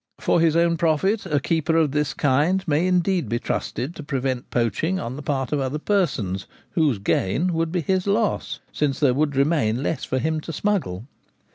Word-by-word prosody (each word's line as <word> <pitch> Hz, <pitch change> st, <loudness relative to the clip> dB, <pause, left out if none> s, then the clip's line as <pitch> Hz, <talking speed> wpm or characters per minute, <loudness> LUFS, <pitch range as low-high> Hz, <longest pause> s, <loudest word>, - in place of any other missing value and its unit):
For -, -, +2 dB
his 165 Hz, -1 st, +3 dB
own 170 Hz, 0 st, +3 dB
profit 190 Hz, +6 st, +1 dB
a 150 Hz, -4 st, +1 dB
keeper 160 Hz, +2 st, 0 dB
of 155 Hz, -4 st, +3 dB
this 150 Hz, 0 st, -1 dB
kind 155 Hz, +8 st, +2 dB
may 155 Hz, +4 st, +2 dB
indeed 180 Hz, 0 st, +1 dB
be 120 Hz, -, 0 dB
trusted 130 Hz, +5 st, -3 dB
to 160 Hz, -, -8 dB
prevent 130 Hz, -3 st, -2 dB
poaching 125 Hz, -, 0 dB
on 120 Hz, +2 st, -4 dB
the 145 Hz, -, -6 dB
part 135 Hz, -3 st, -2 dB
of 150 Hz, -, +1 dB
other 135 Hz, +2 st, -1 dB
persons, 140 Hz, -, -1 dB, 0.2 s
whose 150 Hz, -, +2 dB
gains 100 Hz, -, 0 dB
would 165 Hz, -1 st, -1 dB
be 180 Hz, -1 st, 0 dB
his 185 Hz, +4 st, 0 dB
loss, 210 Hz, +2 st, 0 dB
since 145 Hz, -3 st, -1 dB
there 140 Hz, -4 st, +4 dB
would 145 Hz, +1 st, 0 dB
remain 135 Hz, -4 st, +1 dB
less 145 Hz, -2 st, -2 dB
for 130 Hz, -, -1 dB
him 155 Hz, +3 st, -1 dB
to 165 Hz, -, -6 dB
smuggle. 155 Hz, -, -1 dB
150 Hz, 190 wpm, -23 LUFS, 135-170 Hz, 0.2 s, there